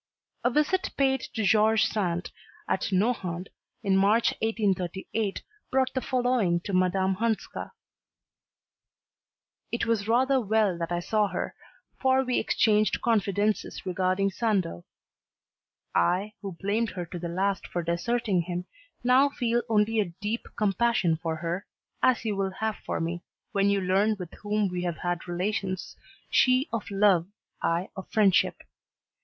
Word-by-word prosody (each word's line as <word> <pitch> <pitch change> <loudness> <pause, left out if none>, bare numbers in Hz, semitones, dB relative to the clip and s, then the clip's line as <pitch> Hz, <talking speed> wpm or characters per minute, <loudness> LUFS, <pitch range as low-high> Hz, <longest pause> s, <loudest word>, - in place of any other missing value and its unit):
A 245 - +4
visit 305 +9 +1
paid 265 -1 +3 0.2
to 220 - 0
George 220 +2 +4
Sand 180 -4 -1 0.4
at 190 - -1
Nohant, 185 -3 0 0.3
in 195 -2 +2
March 205 +4 +4
1838, 200 -1 -1 0.3
brought 260 0 +1
the 260 - -1
following 245 -10 +1
to 200 - -5
Madame 185 +1 +2
Hanska: 225 0 -2 2.0
It 235 - -1
was 225 -3 0
rather 260 +3 +3
well 215 -3 +2
that 170 0 -3
I 175 0 0
saw 210 +3 +1
her, - - -3 0.5
for 265 0 +3
we 250 -1 +1
exchanged 215 -1 +2
confidences 210 -3 0
regarding 185 +1 +1
Sandeau. 190 - -1 1.1
I, 185 - +1
who 195 -3 -5
blamed 210 +3 0
her 175 - -2
to 175 +1 -7
the 170 0 -4
last 190 +3 -1
for 175 - -3
deserting 190 +3 0
him, 175 +1 -4 0.4
now 255 +3 +5
feel 240 -3 0
only 220 0 +2
a 195 -5 0
deep 215 +3 -3
compassion 210 -4 +2
for 165 -1 -1
her, 170 +5 -4 0.3
as 250 -2 +3
you 210 -2 0
will 195 -1 -1
have 220 -1 -1
for - - -4
me, 170 +1 -3 0.3
when 200 -2 +2
you 200 0 +2
learn 195 +4 +2
with 180 -3 -8
whom 210 0 +1
we 180 -1 -3
have 175 -3 -2
had 175 0 -3
relations, 185 +1 -2 0.3
she 255 +3 +3
of 230 - -3
love, 195 -4 +3 0.3
I 170 +3 0
of 190 - -8
friendship. 200 -4 +3
200 Hz, 145 wpm, -27 LUFS, 180-225 Hz, 2.0 s, now